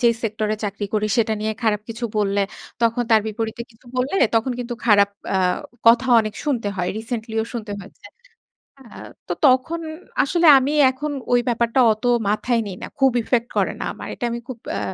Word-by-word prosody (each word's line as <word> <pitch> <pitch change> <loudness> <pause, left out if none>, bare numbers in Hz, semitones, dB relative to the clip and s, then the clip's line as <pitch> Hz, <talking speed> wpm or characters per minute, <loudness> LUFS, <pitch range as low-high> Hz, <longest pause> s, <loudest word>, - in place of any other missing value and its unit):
যেই 235 -2 +4
সেক্টরে 215 -1 -1
চাকরি 205 +1 -3
করি 215 0 +1
সেটা 220 -1 +2
নিয়ে 215 +1 -1
খারাপ 215 -2 +1
কিছু 230 +1 -5
বললে, 200 -1 +1 0.4
তখন 230 +1 +2
তার 220 -1 +6
বিপরীতে 220 +1 -4
কিছু 230 +2 -24
বললে 260 +8 -1 0.2
তখন 230 +3 +1
কিন্তু 240 0 -4
খারাপ 200 -3 +5 0.2
আ - - +2 0.5
কথা 235 +3 +6
অনেক 215 -1 -4
শুনতে 250 -8 -1
হয়। 180 -1 -1
রিসেন্টলি 225 0 -5
ও - - -4
শুনতে 220 -3 -5
হয়েছে। 195 - -15 0.8
আ - - -18 0.5
তো - - -1
তখন 270 +5 +3 0.4
আসলে 340 +4 +2
আমি 270 +2 +1 0.2
এখন 290 +3 -4 0.2
ওই 245 - +5
ব্যাপারটা 235 +1 +1
অত 215 0 -4 0.3
মাথায় 230 +3 +1
নেই 190 - -6
না। - - -5
খুব 270 -1 +5
ইফেক্ট 235 +1 0
করে - - +2
না - - -3
আমার। - - -9
এটা - - -8
আমি 235 - -3
খুব 255 - -7
অ্যা - - -2
230 Hz, 190 wpm, -21 LUFS, 215-250 Hz, 0.8 s, তার